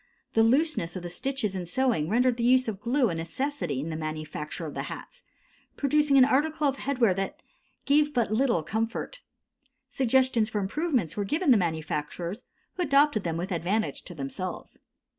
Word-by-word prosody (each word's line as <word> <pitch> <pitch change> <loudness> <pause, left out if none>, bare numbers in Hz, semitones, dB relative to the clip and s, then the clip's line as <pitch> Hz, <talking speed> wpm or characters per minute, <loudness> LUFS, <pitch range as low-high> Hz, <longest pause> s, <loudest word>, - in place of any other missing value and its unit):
The 225 - +4
looseness 240 - +2
of 185 - -5
the 175 - -5
stitches 225 0 -2
in 180 -2 -4
sewing 225 -7 +1
rendered 245 +2 +2
the 235 - -2
use 255 +1 +4
of 210 -4 -3
glue 240 +2 +1
a - - -2
necessity 170 - -3
in 155 - -4
the - - -3
manufacture 155 +1 -5
of 150 - -6
the - - -3
hats, - - -9 0.6
producing 290 0 +3
an 260 - +8
article 300 +3 +1
of 275 0 -1
headwear 250 -8 +2
that 245 +12 -4 0.4
gave 295 +1 +3
but 235 -6 0
little 235 - +2
comfort. 225 - -3 0.7
Suggestions 255 -3 +2
for 220 - -3
improvements 235 - -1
were 205 - -1
given 300 - +1
the - - +8
manufacturers, 170 +3 -3 0.4
who - - -1
adopted 280 - +3
them 165 -1 -2
with 180 +4 -4
advantage 185 +6 -1
to 175 - -9
themselves. 160 +6 -6
225 Hz, 175 wpm, -27 LUFS, 175-275 Hz, 0.7 s, an